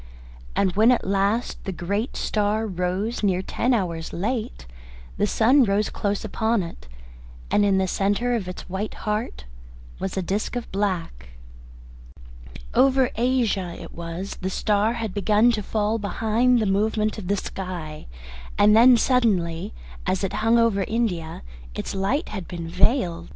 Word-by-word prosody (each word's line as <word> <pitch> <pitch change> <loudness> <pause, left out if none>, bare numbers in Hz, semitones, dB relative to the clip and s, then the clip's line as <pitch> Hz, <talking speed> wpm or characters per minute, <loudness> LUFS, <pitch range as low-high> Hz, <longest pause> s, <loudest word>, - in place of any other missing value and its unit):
And 190 -2 +1
when 220 +4 +6
at 245 - +1
last 200 +4 0
the 195 - -2
great 200 +7 -3
star 215 +1 0
rose 190 +4 -2
near 190 -3 +1
ten 245 +6 -1
hours 170 -8 -1
late, 220 - -3 0.5
the 205 - +2
sun 255 +7 +4
rose 205 -1 +1
close 205 +1 -2
upon 220 0 0
it, 165 - -10 0.6
and 205 - +4
in 200 -1 +3
the 190 0 +1
centre 205 +6 0
of 215 -6 -2
its 180 - -7
white 190 +4 -4
heart 210 - -2 0.5
was 190 0 -3
a 190 - 0
disc 200 +7 -2
of 240 -1 -5
black. 180 - -2 1.4
Over 265 -1 +4
Asia 225 -7 0
it - - -10
was 170 +3 -6
the 185 - -1
star 210 +3 +1
had 225 -5 -4
begun 210 +4 +3
to 220 -3 -1
fall 215 +2 -1
behind 225 +5 +2
the 220 - +1
movement 215 +2 0
of 185 - -7
the 200 +1 +1
sky, 175 - -6 0.5
and 210 +1 +6
then 240 +2 +7
suddenly, 200 -11 +1 0.4
as 190 +1 0
it 195 - -1
hung 225 +2 +4
over 230 -4 +3
India, 180 - -2 0.3
its - - -4
light 195 +10 -1
had 195 -4 -6
been 170 -2 -6
veiled. 175 -2 +1
205 Hz, 155 wpm, -24 LUFS, 185-225 Hz, 1.4 s, then